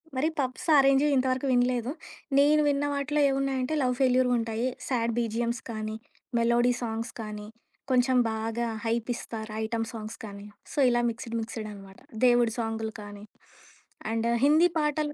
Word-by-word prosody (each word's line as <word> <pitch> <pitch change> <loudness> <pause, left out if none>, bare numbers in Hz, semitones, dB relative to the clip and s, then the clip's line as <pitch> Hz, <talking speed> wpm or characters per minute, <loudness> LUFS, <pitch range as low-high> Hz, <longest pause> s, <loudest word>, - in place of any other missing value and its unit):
మరి 265 +4 +1
pups, 255 +2 -2
orange 275 +1 +5
ఇంతవరకు 260 +1 +1
వినలేదు. 245 0 +1 0.5
నేను 300 +2 +5
విన్న 285 0 +1
వాటిలో 285 +1 0
ఏవున్నాయంటే 270 0 -1
లవ్ 250 -1 +1
ఫెల్యూరుంటాయి. 245 -2 +2 0.2
సాడ్ 235 -3 0
బీజీఎమ్స్ 235 +1 -1
కానీ, 215 -1 -4 0.4
మెలోడీ 235 +1 +3
సాంగ్స్ 225 0 -4
కానీ. 210 -1 -7 0.4
కొంచెం 255 0 +3 0.2
బాగా 225 +2 -2 0.2
హైపిస్తారు. 225 -1 -3
ఐటెమ్ 225 0 -2
సాంగ్స్ 220 0 -7
కానీ. 200 -1 -9 0.3
సో, - - -11
ఇలా 240 0 +2
మిక్సడ్ 230 0 -6
మిక్సడనమాట. 210 -3 -8 0.3
దేవుడి 240 -2 +4
సాంగ్లు 225 -1 -2
కానీ. 205 0 -10 0.9
అండ్ 225 +1 0 0.2
హిందీ 315 +4 +5
పాటలు 300 0 0
240 Hz, 130 wpm, -27 LUFS, 225-260 Hz, 0.9 s, orange